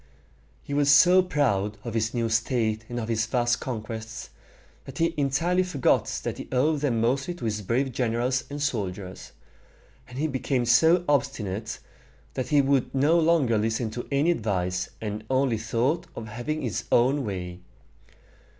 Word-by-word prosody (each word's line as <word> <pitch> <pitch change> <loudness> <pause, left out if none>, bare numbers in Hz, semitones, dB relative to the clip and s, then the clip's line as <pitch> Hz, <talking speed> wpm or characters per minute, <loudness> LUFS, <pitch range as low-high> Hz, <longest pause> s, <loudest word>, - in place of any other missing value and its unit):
He 140 - -6
was 145 0 +2
so 180 +6 +7
proud 105 - 0
of 115 - -5
his 110 0 0
new 120 -2 -1
state 110 -1 0
and 120 0 -3
of 110 - -4
his 110 -1 0
vast 120 0 +1
conquests, 110 -2 -6 0.5
that - - -10
he 165 0 +1
entirely 150 +6 +1
forgot 180 -8 +1 0.2
that - - -4
he - - -7
owed 145 +4 +2
them 130 -6 0
mostly 135 +9 0
to 165 - -7
his 110 -1 -1
brave 125 +7 0
generals 125 +2 0
and 145 +1 -5
soldiers; 100 -9 -4 0.8
and 125 - -10
he 150 - 0
became 130 -3 -1
so 160 +9 +4
obstinate, 115 -7 -1 0.6
that 130 - -3
he 145 -2 +4
would 135 -1 +1
no 150 +6 +4
longer 155 -9 +3
listen 110 +1 -1
to 120 +2 -6
any 145 +5 +3
advice, 90 - -1
and 105 0 -5
only 130 -4 +1
thought 125 +10 -1
of 110 -1 -7
having 120 +8 -4
his 120 -5 -3
own 135 +4 +3
way. 90 -4 -5
125 Hz, 160 wpm, -26 LUFS, 110-145 Hz, 0.8 s, so